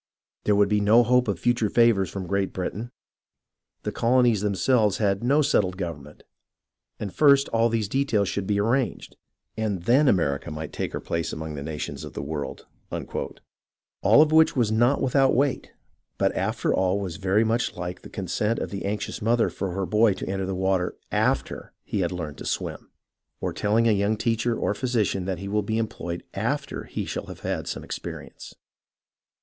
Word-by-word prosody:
There 105 - +3
would 100 0 +4
be 105 0 +2
no 110 +4 +6
hope 125 +1 +3
of 100 -4 0
future 120 -1 +1
favours 115 -5 +3
from 95 -2 -5
Great 100 +1 -1
Britain. 105 +5 -4 0.9
The - - -2
colonies 120 -3 +3
themselves 105 +1 +2
had 100 -1 0
no 145 +5 +3
settled 95 -8 +1
government, 75 -5 -6 0.8
and 100 -3 -5
first 140 -2 +5
all 115 +1 +2
these 110 -2 0
details 115 -5 +1
should 100 0 -3
be 100 -1 +1
arranged, 115 +3 0 0.4
and 110 -4 -1
tJicn 130 +7 +4
America 75 - +1
might 75 +1 -6
take - - -3
her - - -2
place 85 -1 -2
among 80 0 -5
the 70 - -6
nations 75 +1 -5
of - - -8
the - - -5
world" 75 0 -5
— - - -40 1.1
all 150 - +7
of 155 - -1
which 160 0 +5
was 120 -5 +2
not 120 +5 +3
without 135 0 +3
weight, 135 +1 0 0.5
but - - +1
after - - 0
all 95 +1 +1
was 95 -3 -4
very 100 +3 +2
much 115 -2 0
like 90 +1 -5
the - - -11
consent 105 +4 -1
of - - -4
the 100 -1 -4
anxious 105 +1 -3
mother 115 +2 +2
for 95 -2 -3
her 95 +1 -1
boy 105 +1 +3
to 95 - -6
enter 95 -1 -2
the 95 - -2
water 95 -1 0 0.2
after - - -1
he 105 - -3
had 90 -2 0
learned 80 -5 -5
to - - -7
swim; - - -4 0.5
or - - -2
telling 110 +3 +2
a - - +5
young 105 +1 +1
teacher 115 +1 0
or - - 0
physician 110 -6 0
that 95 -1 -2
he 100 +3 -6
will 105 +1 +1
be 110 +2 -2
employ 110 -7 -3 0.2
ed 115 +9 0
^//^r 140 - -8
he - - -4
shall - - -5
have - - -9
had - - -3
some - - -4
experience. - - -8
105 Hz, 190 wpm, -25 LUFS, 95-115 Hz, 1.1 s, all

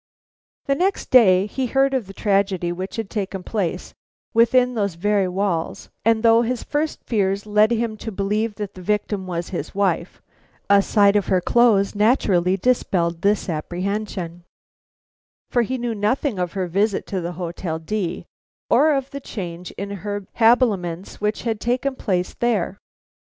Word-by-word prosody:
The 275 - +2
next 370 +7 -1
day 195 -7 +6
he 255 +5 -3
heard 270 +2 +2
of 250 -7 -1
the 195 - -10
tragedy 195 -4 0
which 185 +2 -5
had 225 -3 -3
taken 195 -2 -4
place 195 -4 -3 0.4
within 245 +2 +4
those 200 -6 -1
very 200 +2 +1
walls; 180 -3 -2
and 225 0 +2
though 230 0 +6
his 240 0 -2
first 305 +1 -2
fears 200 -3 0
led 210 +1 +4
him 230 -1 -1
to 225 - -6
believe 210 +2 -1
that 205 -1 -5
the 185 - -11
victim 205 0 -1
was 175 -1 -4
his 180 - -5
wife, 190 -3 0 0.5
a 200 0 +7
sight 200 0 +3
of 205 - +1
her 185 - +3
clothes 210 0 +3
naturally 200 -5 +2
dispelled 175 -7 0
this 205 +1 +1
apprehension, 175 +1 -4 1.1
for 240 - +3
he 255 +3 -2
knew 240 -1 -2
nothing 215 +2 0
of 180 -1 -2
her 190 -2 -1
visit 200 +4 0
to 190 -2 -3
the 175 +1 -4
Hotel 170 -1 -4
D 175 +2 -3 0.5
or 310 +1 +5
of 270 0 -3
the 280 - -5
change 180 -6 -6
in 200 0 -5
her 205 0 -5
habiliments 210 -8 +1
which 210 +1 -1
had 225 -3 -1
taken 255 +3 0
place 180 -7 -1
there. 210 -5 -1
205 Hz, 160 wpm, -22 LUFS, 185-230 Hz, 1.1 s, a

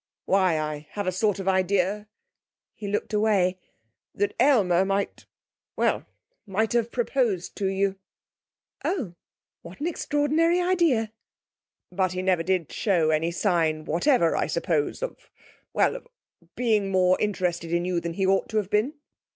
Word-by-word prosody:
'Why, 185 -4 +3
I 150 -1 -4
have 205 -1 -3
a 185 - +1
sort 205 +2 +1
of 195 -1 -6
idea,' 190 +2 +1 0.7
he 205 - -7
looked 205 +2 -2
away, 200 -4 +2 0.6
'that 205 +1 0
Aylmer 205 -10 +4
might 195 +1 -2 0.5
well, - - 0 0.4
might 215 +4 0
have 235 -1 +1
proposed 235 -7 -1
to 195 - 0
you!' 195 0 0 0.9
'Oh! 265 - -2 0.5
What 170 +2 -12
an 295 - -3
extraordinary 325 +1 +1
idea!' 335 -12 +2 0.8
'But 185 0 0
he 185 0 -3
never 185 -3 +2
did 180 -2 -1
show 170 -7 +1
any 155 +2 +1
sign 165 -4 0
whatever, 170 - +2
I - - 0
suppose 165 - -1
of - - -7 0.4
well, - - +2
of - - -9 0.5
being 215 -5 +1
more 185 -1 +3
interested 180 -5 -1
in 170 +1 +1
you 180 -1 0
than 170 0 -4
he 190 +2 0
ought 195 +1 +2
to 220 - -2
have 205 -1 -1
been?' 220 +9 +1
195 Hz, 150 wpm, -25 LUFS, 180-220 Hz, 0.9 s, Aylmer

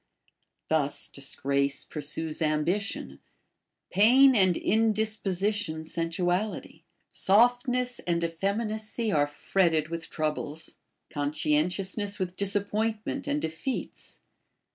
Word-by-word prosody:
Thus 145 -3 0
disgrace 140 0 -1
pursues 155 +2 -4
ambition; 160 +6 -1 0.7
pain 250 +7 +6
and 185 -5 +4
indisposition, 210 -5 0
sensuality; 175 +5 -2 0.3
softness 245 +4 +3
and 170 -1 +1
effeminacy 215 +6 -2
are 145 -1 +3
fretted 155 +1 +1
with 165 0 -5
troubles; 155 0 -3 0.3
contentiousness 160 +8 0
with 185 -2 -3
disappointment 210 +6 -1
and 290 +1 0
defeats. 160 - -5
185 Hz, 80 wpm, -28 LUFS, 155-215 Hz, 0.7 s, pain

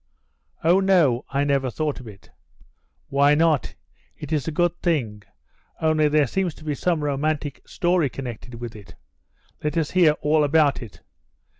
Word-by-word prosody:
"Oh, 175 +4 +4
no. 170 -10 +3
I 140 +1 0
never 140 -2 +1
thought 150 +3 -3
of 125 - -11
it." 100 -2 -14 0.8
"Why 140 +1 +4
not? 160 -2 +1 0.4
It - - -8
is 150 -2 -1
a - - -1
good 175 +2 +1
thing, 120 - -1 0.6
only 155 -1 +2
there 150 0 +3
seems 180 +5 -2
to - - -15
be 150 -1 -2
some 165 +1 -1
romantic 145 0 -2
story 175 -4 +1
connected 125 -2 -8
with 120 -1 -7
it. 105 -3 -13 0.7
Let 150 +2 -2
us 160 -2 0
hear 175 -5 +5
all 150 +1 +3
about 145 -1 +2
it." 115 -5 -11
150 Hz, 160 wpm, -23 LUFS, 135-160 Hz, 0.8 s, hear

